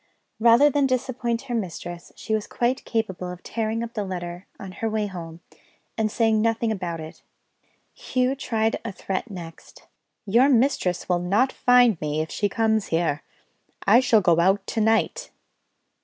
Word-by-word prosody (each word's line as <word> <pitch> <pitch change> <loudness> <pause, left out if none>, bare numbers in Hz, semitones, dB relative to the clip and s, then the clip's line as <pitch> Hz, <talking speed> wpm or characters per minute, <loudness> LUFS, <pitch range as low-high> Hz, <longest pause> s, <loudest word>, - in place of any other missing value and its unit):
Rather 235 +5 +6
than 285 -1 +2
disappoint 255 -2 -2
her 260 -3 -6
mistress, 175 -5 -5
she 220 - -4
was 215 -1 -1
quite 245 +2 -1
capable 190 -6 -2
of 180 0 -9
tearing 225 0 -2
up 235 0 -7
the 210 - -2
letter, 175 -1 -6
on 195 -2 -8
her 225 +4 -3
way 215 -1 -1
home, 170 -4 -8 0.5
and 220 -1 0
saying 220 0 +2
nothing 230 0 +1
about 180 -5 -4
it. 155 0 -10 0.7
Hugh 255 - -1
tried 225 -5 -1
a 230 - -4
threat 195 +4 -4
next: 170 -4 -11 0.4
"Your 235 +7 +4
mistress 235 -8 +1
will 180 -1 +1
not 205 +9 +2
find 245 -6 +4
me, 150 0 -1
if 155 0 -3
she 205 - 0
comes 220 0 +1
here; 165 -3 0 0.6
I 215 +5 +7
shall 240 -4 +4
go 170 -2 +3
out 195 +3 +2
to 225 - -2
night." 225 +1 +1
220 Hz, 165 wpm, -24 LUFS, 180-235 Hz, 0.7 s, I